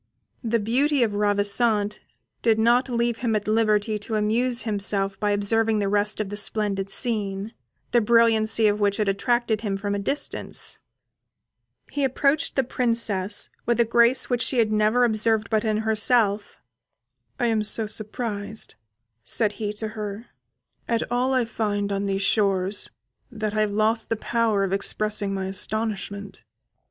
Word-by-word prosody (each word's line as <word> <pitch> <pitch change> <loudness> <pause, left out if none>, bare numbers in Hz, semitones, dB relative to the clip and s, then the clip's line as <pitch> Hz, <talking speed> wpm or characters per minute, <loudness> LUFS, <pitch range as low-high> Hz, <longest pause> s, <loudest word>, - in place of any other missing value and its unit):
The 230 0 +1
beauty 255 +6 +1
of 215 -3 -1
Ravissante 205 +1 +1 0.4
did 225 -2 +3
not 240 +4 +3
leave 235 -1 -1
him 235 -3 0
at 210 -1 -2
liberty 215 -1 +1
to 220 +2 -4
amuse 235 +4 +1
himself 200 -2 -1
by 210 - 0
observing 220 +2 +1
the 205 -1 0
rest 205 +1 +1
of 210 -2 -2
the 205 - -6
splendid 205 -2 0
scene, 205 -1 -2 0.4
the 240 - +4
brilliancy 225 -1 +4
of 210 0 +2
which 200 -1 +1
had 210 - 0
attracted 220 +2 0
him 200 -3 -2
from 200 +1 -3
a 200 - -1
distance. 275 +9 -2 1.1
He 285 - -2
approached 275 +3 +1
the 270 - +2
Princess 230 -6 0 0.2
with 235 0 +1
a 235 - +5
grace 235 +2 +3
which 245 -1 0
she 250 +2 0
had 220 -2 +2
never 215 +3 +2
observed 220 -1 +1
but 215 0 +1
in 215 -2 0
herself. 215 -1 +1 0.8
"I 245 - +1
am 225 -2 +1
so 215 +1 +1
surprised," 215 0 -4 0.5
said 215 -3 0
he 210 0 -4
to 215 +1 -4
her, 210 0 -6 0.6
"at 230 -1 0
all 250 +2 +1
I 250 -2 +2
find 205 -3 -2
on 200 0 -2
these 195 0 -1
shores, 200 -1 +1 0.4
that 215 -3 -3
I 215 - -1
have 210 -1 0
lost 220 +2 0
the 225 - +1
power 225 -2 0
of 195 -1 -1
expressing 205 +1 0
my 190 -1 -3
astonishment. 200 0 -3
215 Hz, 160 wpm, -24 LUFS, 205-230 Hz, 1.1 s, a